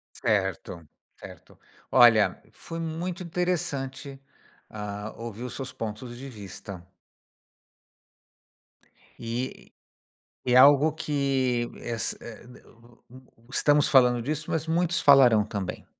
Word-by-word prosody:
Certo, 85 Hz, -3 st, -2 dB, 0.3 s
certo. -, -, -14 dB, 0.3 s
Olha, 120 Hz, -4 st, +5 dB
foi 165 Hz, -, -8 dB
muito 170 Hz, +3 st, -4 dB
interessante, 155 Hz, -6 st, -3 dB, 0.5 s
ah, 105 Hz, 0 st, -7 dB
ouvir 115 Hz, -1 st, -8 dB
os 125 Hz, -, -6 dB
seus 135 Hz, -2 st, -6 dB
pontos 115 Hz, +2 st, -7 dB
de 135 Hz, +3 st, -9 dB
vista. 100 Hz, -5 st, -10 dB, 2.3 s
E 120 Hz, +3 st, -6 dB, 0.7 s
é 125 Hz, -, +1 dB
algo 145 Hz, +3 st, +6 dB
que 135 Hz, -6 st, -1 dB
es 115 Hz, -3 st, -3 dB
e -, -, -14 dB, 0.2 s
e -, -, -16 dB
d 125 Hz, -, -15 dB
u 120 Hz, +1 st, -22 dB, 0.3 s
u 115 Hz, +2 st, -26 dB
estamos 145 Hz, +1 st, +3 dB
falando 125 Hz, -3 st, +4 dB
disso, 155 Hz, +2 st, -4 dB
mas 160 Hz, -1 st, -2 dB
muitos 170 Hz, +1 st, +1 dB
falarão 125 Hz, -7 st, +6 dB
também. 100 Hz, -4 st, -6 dB
130 Hz, 115 wpm, -26 LUFS, 115-150 Hz, 2.3 s, algo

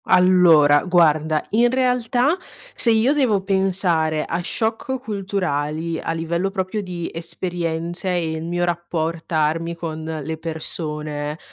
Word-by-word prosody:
Allora 170 Hz, -6 st, +5 dB
guarda, 155 Hz, -3 st, +3 dB
in 235 Hz, +3 st, +4 dB
realtà, 250 Hz, +2 st, +2 dB, 0.4 s
se 235 Hz, -, 0 dB
io 230 Hz, +5 st, +4 dB
devo 235 Hz, -10 st, +2 dB
pensare 185 Hz, -5 st, +1 dB
a 170 Hz, -, -2 dB
shock 225 Hz, +7 st, -2 dB
culturali 170 Hz, -, -2 dB
a -, -, -3 dB
livello 170 Hz, +3 st, -1 dB
proprio 195 Hz, +2 st, -2 dB
di 175 Hz, -3 st, -5 dB
esperienze, 170 Hz, +1 st, -3 dB
e 170 Hz, -3 st, 0 dB
il 160 Hz, 0 st, -4 dB
mio 175 Hz, +1 st, -1 dB
rappor 170 Hz, -1 st, -2 dB
tarmi 165 Hz, +1 st, 0 dB
con 160 Hz, -2 st, -5 dB
le 160 Hz, 0 st, -4 dB
persone, 150 Hz, -2 st, -4 dB
170 Hz, 125 wpm, -21 LUFS, 160-195 Hz, 0.4 s, Allora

